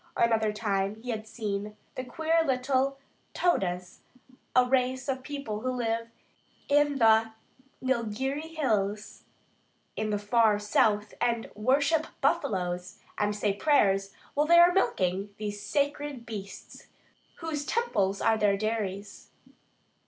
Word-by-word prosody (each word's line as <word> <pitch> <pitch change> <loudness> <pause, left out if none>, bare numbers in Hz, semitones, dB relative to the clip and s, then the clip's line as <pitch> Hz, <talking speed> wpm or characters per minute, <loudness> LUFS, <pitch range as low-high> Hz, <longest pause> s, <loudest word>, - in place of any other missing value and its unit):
Another 225 -2 +2
time 205 -2 -1
he 240 +3 -6
had 220 -1 -5
seen 210 -1 -4 0.2
the 255 - -5
queer 320 +5 +1
little 265 0 +1 0.4
"Todas," 180 - 0 0.6
a 255 0 +6
race 255 +1 0
of 265 -1 -1
people 275 -6 -5
who 255 +4 -2
live 230 -2 -1 0.6
in 290 -1 +3
the 225 -2 +4 0.5
Nilgiri 265 +6 -2
Hills 210 -7 -1 0.7
in 215 0 -2
the 210 - 0
far 210 +1 +3
south 210 0 +1
and 235 -2 0
worship 285 +8 +2
buffaloes, 185 - -1 0.2
and 210 0 +1
say 205 -1 0
prayers 195 -6 +2 0.2
while 295 +1 +1
they 340 +1 +7
are 345 +1 +7
milking 195 - 0
these 205 -1 -5
sacred 285 +2 -2
beasts, 200 -4 -9 0.5
whose 320 -3 -4
temples 205 - 0
are 220 -1 +3
their 200 -2 +3
dairies. 205 -2 -4
225 Hz, 125 wpm, -28 LUFS, 205-275 Hz, 0.7 s, they